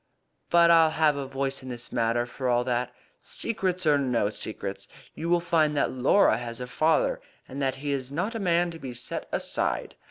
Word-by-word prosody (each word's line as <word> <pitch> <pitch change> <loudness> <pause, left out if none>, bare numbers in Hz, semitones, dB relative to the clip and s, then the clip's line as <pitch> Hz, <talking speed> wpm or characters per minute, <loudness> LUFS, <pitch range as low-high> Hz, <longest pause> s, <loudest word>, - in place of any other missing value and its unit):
"But 170 0 +6
I'll 165 -1 +6
have 155 -2 +2
a 140 -1 -4
voice 135 0 -2
in 130 - -9
the 120 -1 -5
matter, 120 0 +1
for 125 +1 -4
all 120 0 +2
that. 125 0 -1 0.3
Secrets 185 -5 -1
or 145 -2 +4
no 120 -6 0
secrets, - - -4 0.3
you 165 +2 -4
will 175 0 +4
find 155 -3 +1
that - - +1
Laura 130 +5 +3
has 115 0 -6
a 125 - -4
father, 155 +5 +1 0.3
and 135 +2 -6
that 135 -1 0
he 145 +2 -4
is 135 -1 -3
not 180 +10 -2
a 225 - -4
man 175 -2 +1
to 165 - -10
be 130 -4 -7
set 125 - -5
aside. - - -2
140 Hz, 200 wpm, -26 LUFS, 125-165 Hz, 0.3 s, But